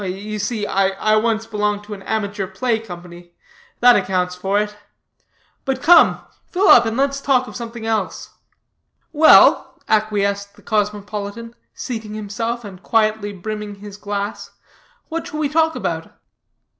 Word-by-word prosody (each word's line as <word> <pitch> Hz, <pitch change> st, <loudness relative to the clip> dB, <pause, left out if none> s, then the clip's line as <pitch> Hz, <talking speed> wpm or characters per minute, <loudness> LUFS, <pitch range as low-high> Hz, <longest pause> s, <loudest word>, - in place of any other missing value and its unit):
"You 200 Hz, +3 st, -5 dB
see, 210 Hz, 0 st, -2 dB
I 195 Hz, +2 st, +1 dB
once 225 Hz, 0 st, 0 dB
belonged 210 Hz, -2 st, -1 dB
to 210 Hz, 0 st, -8 dB
an 195 Hz, -, -9 dB
amateur 200 Hz, -1 st, -3 dB
play 220 Hz, +5 st, -1 dB
company; 175 Hz, -4 st, -11 dB, 0.5 s
that 245 Hz, 0 st, +7 dB
accounts 185 Hz, -2 st, 0 dB
for 195 Hz, +3 st, 0 dB
it. 210 Hz, 0 st, -3 dB, 0.9 s
But 265 Hz, -2 st, -3 dB
come, 340 Hz, +1 st, +6 dB, 0.3 s
fill 380 Hz, +3 st, +2 dB
up, 235 Hz, -1 st, +8 dB
and 225 Hz, +1 st, -2 dB
let's 275 Hz, 0 st, 0 dB
talk 260 Hz, -2 st, +2 dB
of -, -, -10 dB
something 235 Hz, -1 st, -7 dB
else." 220 Hz, -4 st, -2 dB, 0.8 s
"Well," 310 Hz, +1 st, +6 dB
acquiesced 200 Hz, -2 st, 0 dB
the -, -, -20 dB
cosmopolitan, 210 Hz, +1 st, -3 dB, 0.2 s
seating 220 Hz, -4 st, -6 dB
himself, 225 Hz, +3 st, -4 dB
and 190 Hz, -2 st, -10 dB
quietly 215 Hz, -1 st, +1 dB
brimming 210 Hz, +1 st, -6 dB
his 200 Hz, 0 st, -10 dB
glass, 205 Hz, 0 st, -5 dB, 0.6 s
"what 330 Hz, 0 st, -4 dB
shall 305 Hz, -, -6 dB
we 295 Hz, -2 st, 0 dB
talk 320 Hz, +2 st, +2 dB
about?" -, -, -4 dB
210 Hz, 145 wpm, -20 LUFS, 200-230 Hz, 0.9 s, up